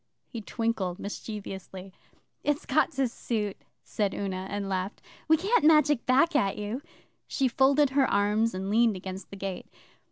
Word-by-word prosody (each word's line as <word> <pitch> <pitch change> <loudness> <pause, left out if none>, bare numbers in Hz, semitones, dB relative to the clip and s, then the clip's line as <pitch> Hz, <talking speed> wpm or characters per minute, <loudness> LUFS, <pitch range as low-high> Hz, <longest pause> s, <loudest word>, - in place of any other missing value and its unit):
He 230 - -7
twinkled 215 -5 -2
mischievously. 195 -2 -7 0.5
'It's 295 +1 0
got 290 +3 +2
to 270 -1 +1
suit,' 215 -4 -3 0.2
said 205 -2 -1
Una, 190 -1 -3
and 200 -1 -3
laughed. 190 +1 -3 0.3
'We 320 0 +5
Can't 395 +4 +2
magic 300 -5 +4
back 275 +6 +4
at 200 -9 +2
you.' 210 +5 -4 0.5
She 270 - +1
folded 270 +3 +3
her 270 -1 +3
arms 210 +1 +2
and 190 +1 -3
leaned 225 -1 +4
against 190 +1 -7
the - - -9
gate. 195 -1 -5
215 Hz, 155 wpm, -28 LUFS, 195-270 Hz, 0.5 s, We